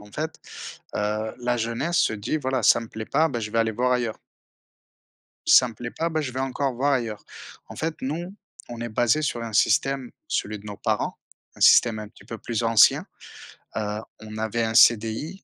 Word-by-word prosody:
En 105 Hz, 0 st, -15 dB
fait, 160 Hz, +5 st, -4 dB, 0.6 s
heu, 105 Hz, +1 st, -1 dB
la 120 Hz, 0 st, 0 dB
jeunesse 115 Hz, +10 st, -1 dB
se -, -, +3 dB
dit: 110 Hz, +9 st, -2 dB
«Voilà, 130 Hz, -3 st, -1 dB
ça -, -, +5 dB
me 115 Hz, -, -8 dB
plaît 110 Hz, 0 st, -7 dB
pas, 160 Hz, +7 st, +2 dB
bah, 120 Hz, -5 st, -3 dB
je 105 Hz, -1 st, -4 dB
vais 115 Hz, -, -1 dB
aller 110 Hz, 0 st, +2 dB
voir 125 Hz, +3 st, 0 dB
ailleurs». 120 Hz, -3 st, -1 dB, 1.3 s
«Ça 125 Hz, -, +7 dB
me 115 Hz, -, -10 dB
plaît 120 Hz, +2 st, -6 dB
pas, 165 Hz, +6 st, -2 dB
bah, 160 Hz, -1 st, -1 dB
je 135 Hz, -5 st, -4 dB
vais 130 Hz, -, -3 dB
encore 135 Hz, 0 st, -1 dB
voir 140 Hz, +4 st, +1 dB
ailleurs». 115 Hz, -5 st, -2 dB, 0.4 s
En -, -, -10 dB
fait, 160 Hz, 0 st, -2 dB
nous 170 Hz, +8 st, -4 dB, 0.4 s
on 120 Hz, -1 st, -6 dB
est 120 Hz, -, -4 dB
basés 120 Hz, +7 st, +2 dB
sur 120 Hz, -5 st, -2 dB
un 115 Hz, -2 st, -6 dB
système, 135 Hz, +3 st, +2 dB, 0.2 s
celui 105 Hz, 0 st, -2 dB
de 105 Hz, -, -14 dB
nos 105 Hz, -1 st, -7 dB
parents, -, -, -1 dB, 0.4 s
un -, -, -17 dB
système 115 Hz, -3 st, +6 dB
un 105 Hz, -, -6 dB
petit -, -, -19 dB
peu 115 Hz, -, -6 dB
plus 115 Hz, +1 st, -3 dB
ancien, 115 Hz, -2 st, +5 dB, 0.7 s
heu, 105 Hz, 0 st, -2 dB, 0.2 s
on 110 Hz, 0 st, -9 dB
avait 110 Hz, +1 st, -1 dB
un 110 Hz, 0 st, -1 dB
CDI, 115 Hz, -, +3 dB
120 Hz, 205 wpm, -24 LUFS, 110-135 Hz, 1.3 s, Ça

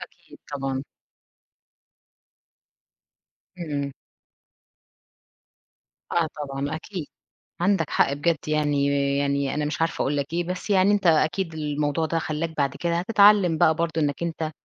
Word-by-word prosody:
أكيد -, -, -13 dB
طبعًا. 135 Hz, -1 st, -3 dB, 2.7 s
إمم. 145 Hz, -5 st, -3 dB, 2.2 s
آه 170 Hz, -1 st, +2 dB, 0.2 s
طبعًا، 140 Hz, +2 st, -3 dB
أكيد 165 Hz, -1 st, -6 dB, 0.5 s
عندك 175 Hz, -4 st, +1 dB
حق، 140 Hz, -, +2 dB
بجد 160 Hz, +3 st, +1 dB
يعني، 145 Hz, -2 st, +1 dB, 0.3 s
يعني 140 Hz, -1 st, 0 dB
أنا 150 Hz, -, -1 dB
مش 150 Hz, +1 st, -3 dB
عارفة 165 Hz, 0 st, 0 dB
أقول 145 Hz, +2 st, 0 dB
لك 140 Hz, -1 st, -1 dB
إيه، 175 Hz, +1 st, 0 dB
بس 180 Hz, +4 st, -5 dB
يعني 195 Hz, 0 st, +4 dB
أنت 205 Hz, -2 st, +1 dB
أكيد 165 Hz, +2 st, +2 dB
الموضوع 150 Hz, 0 st, -1 dB
ده 165 Hz, +1 st, -1 dB
خلّاك 160 Hz, +1 st, -3 dB
بعد 140 Hz, -1 st, 0 dB
كده 170 Hz, +1 st, -1 dB
هتتعلم 200 Hz, -3 st, +5 dB
بقى 160 Hz, -, +5 dB
برضه 165 Hz, -1 st, -1 dB
إنك 145 Hz, +2 st, -1 dB
أنت 160 Hz, -2 st, -2 dB
160 Hz, 125 wpm, -24 LUFS, 145-170 Hz, 2.7 s, هتتعلم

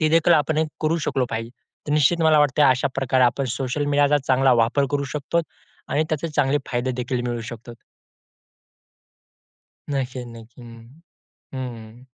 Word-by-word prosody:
ते 155 Hz, -, +3 dB
देखील 165 Hz, +1 st, +4 dB
आपण 155 Hz, 0 st, +1 dB, 0.2 s
करू 160 Hz, +2 st, +1 dB
शकलो 130 Hz, -2 st, 0 dB
पाहिजे. 115 Hz, +1 st, -4 dB, 0.4 s
तर 145 Hz, -, 0 dB
निश्चित 155 Hz, +3 st, +3 dB
मला 155 Hz, -1 st, +5 dB
वाटतंय 145 Hz, 0 st, +3 dB
अशा 130 Hz, +1 st, +3 dB
प्रकारे 130 Hz, -1 st, +2 dB
आपण 125 Hz, +3 st, +1 dB
सोशल 135 Hz, +2 st, -2 dB
मीडियाचा 145 Hz, 0 st, +3 dB
चांगला 130 Hz, 0 st, +4 dB
वापर 140 Hz, +5 st, +1 dB
करू 140 Hz, -1 st, -1 dB
शकतो 150 Hz, +3 st, -1 dB, 0.5 s
आणि 145 Hz, +3 st, +1 dB
त्याचे 155 Hz, +2 st, -2 dB
चांगले 145 Hz, -1 st, +1 dB
फायदे 125 Hz, +1 st, -1 dB
देखील 125 Hz, 0 st, -3 dB
मिळू 120 Hz, -1 st, -3 dB
शकतो. 120 Hz, +1 st, -10 dB, 2.2 s
नक्कीच, 130 Hz, -2 st, -3 dB
नक्की. 115 Hz, +1 st, -13 dB
हं. 115 Hz, +6 st, -14 dB, 0.5 s
हं, -, -, -4 dB, 0.2 s
हं. 115 Hz, +3 st, -14 dB
135 Hz, 155 wpm, -22 LUFS, 120-150 Hz, 2.2 s, मला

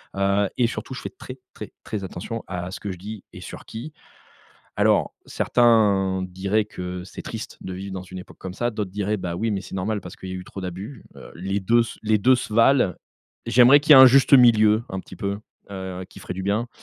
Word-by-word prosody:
Heu 100 Hz, +1 st, +2 dB
et 120 Hz, -2 st, +3 dB
surtout 125 Hz, -, -6 dB
je 125 Hz, -, -7 dB
fais -, -, -5 dB
très, 130 Hz, 0 st, -11 dB, 0.2 s
très, -, -, -8 dB
très 100 Hz, -2 st, -5 dB
attention 110 Hz, +5 st, -6 dB
à 90 Hz, 0 st, -5 dB
ce -, -, -7 dB
que 100 Hz, -, -5 dB
je 90 Hz, -, -7 dB
dis 105 Hz, +1 st, -8 dB
et -, -, -10 dB
sur -, -, -9 dB
qui! 120 Hz, +8 st, -8 dB, 0.8 s
Alors, -, -, +2 dB
certains 100 Hz, -6 st, +2 dB
diraient 95 Hz, +4 st, -1 dB
que: 90 Hz, -3 st, -7 dB
«C'est 95 Hz, -, -10 dB
triste -, -, -7 dB
de 95 Hz, -, -6 dB
vivre 95 Hz, +1 st, -7 dB
dans 95 Hz, -, -5 dB
une 95 Hz, 0 st, -9 dB
époque -, -, -15 dB
comme 95 Hz, -1 st, -7 dB
ça!» 120 Hz, +4 st, -1 dB
D'autres, 105 Hz, -3 st, -4 dB
diraient: 105 Hz, +2 st, -2 dB
«Bah, 85 Hz, -2 st, -4 dB
oui! 110 Hz, +5 st, -1 dB
Mais 100 Hz, -2 st, -1 dB
c'est 95 Hz, -, -10 dB
normal 105 Hz, +3 st, -2 dB
parce 90 Hz, 0 st, -10 dB
qu'il 95 Hz, -, -8 dB
y -, -, -5 dB
a -, -, -4 dB
eu 90 Hz, -, -8 dB
trop 95 Hz, -, -9 dB
d'abus». 95 Hz, +6 st, -7 dB
Heu, -, -, -12 dB
les 95 Hz, +4 st, -3 dB
2 115 Hz, +5 st, +3 dB
se 115 Hz, -, -8 dB
les 110 Hz, 0 st, +2 dB
2 130 Hz, +6 st, +5 dB
se 115 Hz, -3 st, -5 dB
valent. 115 Hz, -4 st, +4 dB, 0.5 s
J'aimerais 125 Hz, +5 st, +6 dB
qu'il 155 Hz, -, -4 dB
y -, -, +10 dB
ait -, -, +11 dB
un -, -, +11 dB
juste 135 Hz, +2 st, +6 dB
milieu, 110 Hz, -3 st, +5 dB
un 95 Hz, -, -4 dB
petit 95 Hz, -, -13 dB
peu. 100 Hz, +2 st, -3 dB, 0.3 s
Heu, 95 Hz, -1 st, -6 dB
qui -, -, -13 dB
ferait -, -, -6 dB
du 95 Hz, -, -5 dB
bien. 105 Hz, +5 st, -1 dB
100 Hz, 240 wpm, -23 LUFS, 95-115 Hz, 0.8 s, ait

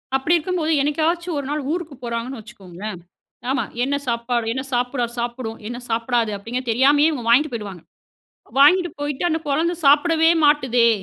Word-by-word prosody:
அப்படி 270 Hz, +6 st, +2 dB
இருக்கும்போது, 330 Hz, -1 st, -1 dB
என்னைக்காச்சும் 325 Hz, +4 st, 0 dB
1 280 Hz, -, -5 dB
நாள் 295 Hz, -1 st, -2 dB
ஊருக்கு 335 Hz, -3 st, -4 dB
போறாங்கன்னு 235 Hz, +2 st, -4 dB
வச்சுக்கோங்களேன். 200 Hz, -3 st, -9 dB, 0.5 s
ஆமா, 270 Hz, 0 st, +1 dB, 0.2 s
என்ன 275 Hz, +2 st, 0 dB
சாப்பாடு 235 Hz, 0 st, -1 dB
என்ன 260 Hz, +1 st, -3 dB
சாப்பிட்ரார் 245 Hz, -1 st, -1 dB
சாப்பிடும், 235 Hz, -1 st, -4 dB
என்ன 240 Hz, +1 st, -5 dB
சாப்பிடாது? 230 Hz, 0 st, 0 dB
அப்படிங்க 230 Hz, +5 st, -4 dB
தெரியாமயே 285 Hz, +6 st, +4 dB
இவுங்க 255 Hz, -7 st, -5 dB
வாங்ட்டு 280 Hz, +5 st, +4 dB
போயிடுவாங்க. 200 Hz, -6 st, -6 dB, 0.8 s
வாங்கிட்டு 350 Hz, +5 st, +5 dB
போயிட்டு, 290 Hz, +1 st, -3 dB
"அந்த 320 Hz, -1 st, 0 dB
குழந்தை 320 Hz, +5 st, +1 dB
சாப்பிடவே 320 Hz, +3 st, +5 dB
மாட்டுதே, 260 Hz, -5 st, +4 dB
265 Hz, 145 wpm, -21 LUFS, 235-305 Hz, 0.8 s, வாங்கிட்டு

